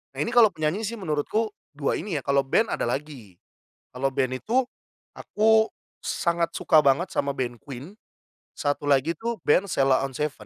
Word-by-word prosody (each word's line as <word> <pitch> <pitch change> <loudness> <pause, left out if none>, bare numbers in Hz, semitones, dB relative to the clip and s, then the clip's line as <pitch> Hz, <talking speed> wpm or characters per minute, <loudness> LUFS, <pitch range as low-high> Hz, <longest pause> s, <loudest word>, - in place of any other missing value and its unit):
Nah - - -7
ini - - -1
kalau 230 -4 +6
penyanyi 155 +8 -2
sih 230 +3 -3
menurutku 190 +7 -1 0.2
2 145 -1 0
ini 175 -3 -3
ya, - - -9
kalau 140 0 +2
band 220 +11 +2
ada - - -1
lagi. 125 - -5 0.6
Kalau 135 +2 0
band 130 -1 0
itu 255 +4 +2 0.5
aku 220 +1 +3 0.4
sangat 170 -1 0
suka 155 - +3
banget 140 +7 +2
sama 140 - -1
band 120 -2 -3
Queen, 145 - -10 0.6
satu 145 0 -2
lagi 140 +4 +3
tuh 235 -1 -3
band 185 +7 +3
Sheila 135 -4 +2
on 135 - -10
7. 150 +2 -1
150 Hz, 170 wpm, -25 LUFS, 135-205 Hz, 0.6 s, kalau